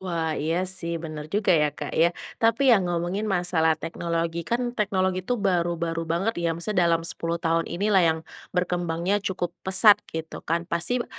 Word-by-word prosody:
Wah, 165 -4 -2
iya 165 +5 -1
sih 170 -3 -3
benar 155 -2 -7
juga 205 +3 +2
ya, 150 -3 +4
Kak, - - -5
ya, 165 +1 +4 0.3
tapi 230 +3 +4
ya 215 - +5
ngomongin 180 +4 -2
masalah 175 -4 +2
teknologi 170 +1 -3
kan 240 +1 0
teknologi 190 -4 0
tuh 245 +7 -2
baru-baru 170 -4 -1
banget 175 +7 0
ya, 165 -1 0
maksudnya 175 0 +1
dalam 165 0 +1
10 165 0 -3
tahun 165 0 0
inilah 195 +3 +2
yang 160 -2 +3 0.4
berkembangnya 180 +2 0
cukup 185 -3 -3
pesat 190 +2 +5
gitu 160 0 -6
kan. 170 +1 -1
Pasti 180 +9 -1
175 Hz, 165 wpm, -25 LUFS, 165-190 Hz, 0.4 s, ya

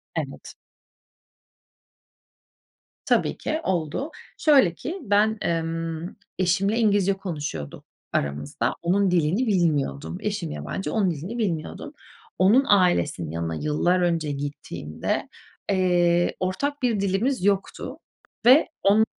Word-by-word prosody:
Evet. - - -5 2.5
Tabii - - +1
ki 315 - -2
oldu. 180 - -2 0.3
Şöyle 270 - +5
ki 335 - -6
ben, 210 +1 +2
emm, 165 0 -2 0.3
eşimle 195 +4 +2
İngilizce 205 -3 +3
konuşuyorduk 145 - -6 0.3
aramızda. 70 +1 -1
Onun 190 +2 +2
dilini 180 +8 +2
bilmiyordum. 145 - 0
Eşim - - -3
yabancı, 75 - -4
onun 200 -5 +2
dilini 170 +10 -5
bilmiyordum. 175 -9 -3 0.5
Onun 220 +9 +5
ailesinin 130 - +2
yanına 80 0 -3
yıllar 155 - +1
önce 165 -4 0
gittiğimde, 140 - -4 0.4
eee, 175 -2 +2
ortak 280 +11 -2
bir 235 -5 +1
dilimiz 200 +5 0
yoktu 205 +8 -1 0.5
ve 260 +6 +7 0.2
on 210 +3 +5
180 Hz, 105 wpm, -24 LUFS, 155-205 Hz, 2.5 s, ve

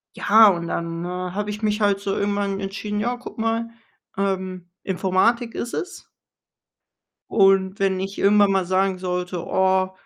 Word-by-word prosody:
ja, 220 +1 +6
und 170 -2 -1
dann, 170 0 -4
äh, - - -4
habe 185 +3 -4
ich 210 +1 -7
mich 210 0 0
halt 200 -1 +2
so 200 -1 -2
irgendwann 200 -1 -1
entschieden: 205 +1 -4
„Ja, 245 +3 -1
guck 245 - -11
mal, 225 +1 -1 0.5
ähm, 185 -2 -3
Informatik 195 +6 0
ist 240 - -5
es.“ 370 +2 -6 1.3
Und 195 -1 +3
wenn 190 -1 +1
ich 195 +1 -5
irgendwann 205 0 +4
mal 190 -2 +1
sagen 185 0 0
sollte: 180 -1 -3
„Oh, 190 0 +2
195 Hz, 155 wpm, -22 LUFS, 185-210 Hz, 1.3 s, ja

